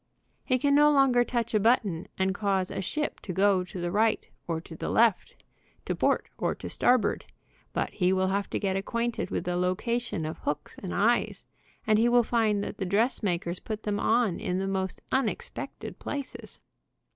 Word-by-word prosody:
He 255 - +2
can 280 +3 +2
no 295 +1 +6
longer 270 -4 +4
touch 235 -1 -2
a 215 - +4
button 205 -6 +2
and 190 0 +1
cause 195 -2 0
a - - -3
ship 300 +10 -2
to 190 - -6
go 190 0 +3
to 180 +1 -8
the 175 0 -2
right 215 +3 +2 0.2
or 165 -2 -1
to 160 0 -10
the - - -4
left, 225 -4 +2 0.4
to - - -1
port - - +1
or - - 0
to - - -7
starboard, 245 -5 +2 0.5
but - - -2
he 180 -2 +1
will 190 0 +2
have 200 +1 -1
to - - -2
get 195 -2 0
acquainted 235 +4 -2
with - - -2
the 180 0 -2
location 185 +1 -1
of 155 - -5
hooks 145 - -4
and 185 - -6
eyes, 235 +4 +1 0.4
and 215 -1 +4
he 235 +2 +4
will 240 0 +5
find 220 -3 +1
that 205 - -6
the - - -3
dressmakers 185 -4 0
put 215 -1 -6
them 205 -1 -1
on 225 -5 +2
in 180 - -2
the 190 - -1
most 190 -1 -3
unexpected 270 - -3
places. 285 -2 -6
205 Hz, 190 wpm, -28 LUFS, 185-240 Hz, 0.5 s, no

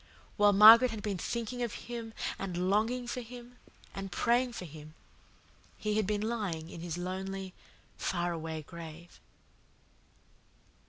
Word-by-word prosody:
While 205 -1 +5
Margaret 225 +5 +10
had 220 -3 -6
been 200 -4 -2
thinking 235 +4 -3
of 235 -3 -2
him 230 -2 -6 0.2
and 185 -1 -1
longing 230 +4 +1
for 245 +1 -4
him 245 +1 -11 0.4
and 195 -1 -6
praying 240 +5 +2
for 185 - -6
him 155 0 -11 0.8
he 215 -1 -1
had 215 -3 +1
been 210 -1 0
lying 195 -8 -3
in 165 - -8
his 170 -1 -4
lonely, 190 +1 -4 0.5
faraway 165 -3 -2
grave." 170 +1 -11
200 Hz, 130 wpm, -31 LUFS, 175-230 Hz, 0.8 s, Margaret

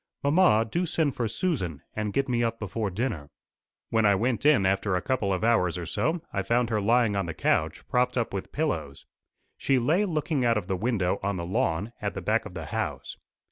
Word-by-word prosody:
Mamma, 145 -7 +4
do 170 +10 -1
send 155 -4 0
for 120 - -1
Susan, 110 - -2
and 105 -1 -2
get 140 +5 0
me 120 -2 +1
up 115 -1 -1
before 105 0 -3
dinner." 90 - -3 0.6
When 110 -1 +3
I 100 -1 +5
went 120 +6 +1
in 140 -11 +5
after 95 0 +1
a 90 - 0
couple 120 -7 0
of 95 +2 -1
hours 90 -7 +2
or 90 - -4
so, 160 - -1
I 95 - 0
found 120 +3 +1
her 105 -1 +1
lying 115 0 +3
on 100 -3 -1
the 80 - -5
conch, - - 0
propped 125 +1 +1
up 115 -4 -1
with 95 - -5
pillows. 145 - -3 0.5
She 135 - +2
lay 160 - +2
looking 155 -5 -1
out 115 -2 +3
of 105 - -2
the 95 0 -1
window 95 -3 0
on 100 -1 -1
the 85 - -4
lawn 95 +1 -1
at - - -3
the - - -3
back - - 0
of - - -13
the - - -5
house. - - -4
115 Hz, 220 wpm, -27 LUFS, 95-130 Hz, 0.6 s, I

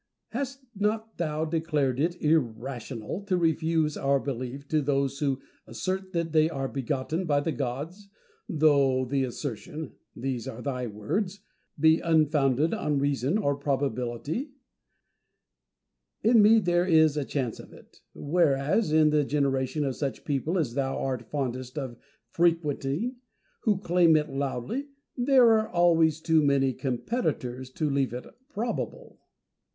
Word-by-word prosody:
Hast 270 +2 -5
not 215 +2 -2
thou, 155 -2 -1
declared 155 -5 0
it 170 +4 0
irrational 125 - -1
to 190 -3 +1
refuse 160 -2 +1
our 140 0 +2
belief 135 +1 -5
to 155 -1 +2
those 140 -1 0
who 140 -3 0 0.3
assert 185 +11 -3
that 170 -1 -1
they 155 0 +4
are 135 -4 -3
begotten 140 +6 -2
by 145 -3 +2
the 160 +3 -1
gods, 150 +10 -5 0.4
though 140 -6 +3
the 135 +1 0
assertion 135 +3 -5 0.2
(these 125 -2 -3
are 120 +2 -7
thy 125 -3 -2
words) 180 - -3 0.4
be 160 +1 +5
unfounded 150 -3 +2
on 150 -1 0
reason 140 - +1
or 145 -9 +1
probability 140 - -2 1.7
1 230 +2 +5
In - - +8
me 215 +2 +7
there 175 -3 +2
is 160 -3 +5
a 150 - 0
chance 130 -4 -3
of - - -12
it: - - -18
whereas 150 +3 +1
in 155 -1 +5
the 150 -1 +3
generation 140 0 0
of 135 -2 -2
such 140 -3 -4
people 150 +5 -1
as 145 -9 -1
thou 135 0 -1
art 125 -4 -3
fondest 130 -2 -3
of 130 -4 -4 0.4
frequenting, 165 - 0 0.5
who 210 -4 +3
claim 175 -3 +4
it 150 -1 +1
loudly, 140 - -3 0.3
there 250 -2 +5
are 220 0 -3
always 165 -4 +3
too 160 -1 +3
many 140 -2 +2
competitors 130 - -2
to 155 +4 -2
leave 140 -3 0
it 125 - -6 0.2
probable. 235 -4 -4
150 Hz, 140 wpm, -27 LUFS, 135-170 Hz, 1.7 s, In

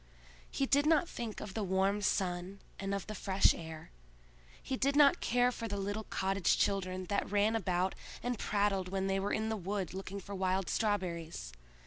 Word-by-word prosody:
He 275 - 0
did 285 +2 +3
not 320 +1 +4
think 230 -7 -5
of 200 - -6
the 220 - -2
warm 195 +2 +1
sun 185 -1 -1 0.2
and 195 0 -1
of 200 - -4
the 215 - -6
fresh 195 -1 +3
air; 160 -1 -8 0.7
he 265 - -3
did 275 +2 +1
not 295 +4 +6
care 245 +1 +3
for 230 -2 -5
the 200 -1 -3
little 205 +2 -3
cottage 195 -1 +1
children 185 -2 0
that 200 +2 -1
ran 210 +2 +2
about 185 -3 0 0.3
and 245 -2 -2
prattled 200 -3 +1
when 190 0 -1
they 195 0 +1
were 200 +1 -1
in 220 0 0
the 220 - 0
wood 195 -1 -3
looking 195 +1 -5
for 200 +1 -8
wild 190 -1 0
strawberries. 170 - -2
195 Hz, 185 wpm, -33 LUFS, 190-220 Hz, 0.7 s, not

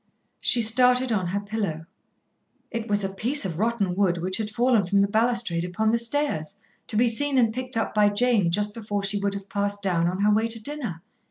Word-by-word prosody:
She 235 - +4
started 250 +2 +3
on 190 -5 0
her 195 +3 -2
pillow. 200 -6 -4 0.9
It 230 -1 -4
was 205 0 +1
a 195 - -1
piece 235 +7 0
of 170 -3 -4
rotten 215 -5 0
wood 185 -3 +1
which 185 +2 -2
had 220 -2 -3
fallen 235 0 +2
from 200 - +1
the 200 0 +4
balustrade 225 -5 0
upon 200 +5 0
the 235 - +2
stairs, 230 - -1 0.3
to - - -3
be 240 +3 +3
seen 275 +4 0
and 230 -3 +3
picked 255 0 -3
up 225 - -1
by 210 -1 +4
Jane 210 -3 +2
just 205 +4 0
before 205 -3 -4
she 200 +1 0
would 200 0 -2
have 200 0 -8
passed 205 0 -2
down 170 -3 +1
on 185 +3 -2
her 210 +1 +3
way 220 +2 +1
to 225 0 -2
dinner. 225 - -5
210 Hz, 220 wpm, -24 LUFS, 195-235 Hz, 0.9 s, She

